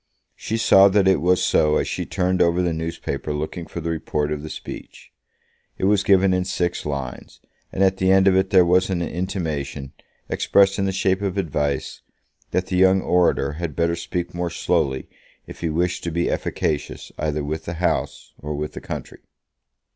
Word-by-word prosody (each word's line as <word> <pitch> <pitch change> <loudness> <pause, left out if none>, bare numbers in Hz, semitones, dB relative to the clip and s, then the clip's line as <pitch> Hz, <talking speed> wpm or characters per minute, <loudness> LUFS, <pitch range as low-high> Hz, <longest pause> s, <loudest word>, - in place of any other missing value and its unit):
She 115 - -3
saw 100 -3 +6
that 100 -1 +3
it 95 - +3
was 90 +1 +2
so 75 -1 +3
as - - -1
she - - -3
turned 90 0 0
over 85 +1 +3
the 85 -2 0
newspaper 80 -3 -4
looking 80 +3 -4
for 85 - -6
the 85 +1 -2
report 75 -2 -2
of 75 -1 -3
the 80 - -7
speech. - - -9 0.7
It - - -6
was 100 +1 +3
given 95 -1 +4
in 90 0 +1
six 90 -3 -2
lines, 70 -3 -6 0.3
and 95 - 0
at 95 0 +3
the 95 0 +2
end 95 0 +5
of 95 - +5
it 95 - +2
there 95 -2 +5
was 90 +2 +3
an 90 -2 -1
intimation, 80 -7 -4 0.3
expressed 100 0 +3
in 100 - +1
the 95 - 0
shape 95 0 0
of 100 -1 -2
advice, 75 -6 -2 0.5
that 90 - 0
the 90 -1 -2
young 95 +1 +5
orator 90 -6 +2
had 85 -5 -4
better 85 0 +1
speak 85 +1 -4
more 85 0 -2
slowly 65 -5 -1 0.4
if - - -11
he 85 - -1
wished 85 +3 -1
to - - -1
be 85 +2 0
efficacious 75 -2 -3
either 75 -1 -1
with 75 +2 -4
the 85 - -4
House 90 +1 -2
or 75 +1 -5
with 75 +1 -4
the - - -7
country. - - -7
85 Hz, 190 wpm, -22 LUFS, 75-95 Hz, 0.7 s, saw